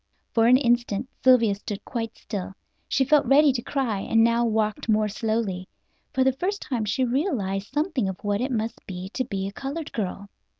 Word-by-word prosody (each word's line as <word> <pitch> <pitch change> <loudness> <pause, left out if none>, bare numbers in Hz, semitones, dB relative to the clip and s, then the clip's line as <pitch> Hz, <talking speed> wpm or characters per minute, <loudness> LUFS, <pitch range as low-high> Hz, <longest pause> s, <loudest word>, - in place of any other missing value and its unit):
For 225 -1 +4
an 250 +1 +7
instant 240 -3 +1 0.2
Sylvia 245 -5 +5
stood 200 0 -6
quite 230 -3 -4
still. 195 -3 -6 0.3
She 265 - +2
felt 295 +2 +4
ready 285 0 +6
to 240 - -2
cry, 240 -6 -1
and 225 +3 +3
now 235 +1 +3
walked 215 0 -1
more 215 0 +3
slowly. 210 -3 -2 0.4
For 260 - +2
the 265 0 +3
first 385 +9 -2
time 235 -5 -2
she 260 +6 0
realized 235 - -1
something 290 - 0
of 190 - -5
what 205 +1 0
it 260 +2 -1
must 225 -1 -3
be 185 0 -6
to 255 - -2
be 195 -5 -3
a - - -5
colored 285 +6 -5
girl. 200 -1 -3
230 Hz, 195 wpm, -25 LUFS, 205-260 Hz, 0.4 s, an